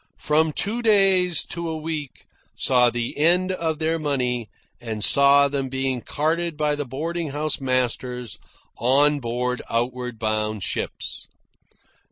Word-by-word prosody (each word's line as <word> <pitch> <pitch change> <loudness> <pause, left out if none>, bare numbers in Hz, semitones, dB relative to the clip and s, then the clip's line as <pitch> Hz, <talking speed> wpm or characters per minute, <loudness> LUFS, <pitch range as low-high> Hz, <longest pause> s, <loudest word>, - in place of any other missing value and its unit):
From 155 +1 +1
two 215 +9 0
days 195 -6 +4
to 170 -1 -3
a 160 - -3
week 155 -3 -6 0.3
saw 125 -2 +4
the 120 0 -3
end 180 +4 +3
of 165 -4 -2
their 160 +1 0
money 125 -6 -1 0.3
and 110 -3 -5
saw 140 +2 +6
them 135 -1 -3
being 130 -1 -1
carted 160 +4 -1
by 150 -1 +1
the 145 0 -3
boarding 165 +6 -3
house 150 +1 -2
masters 125 -2 -1 0.4
on 145 +5 +3
board 125 0 -2
outward 125 0 -2
bound 110 -2 -2
ships. - - -4
140 Hz, 135 wpm, -23 LUFS, 125-160 Hz, 0.4 s, saw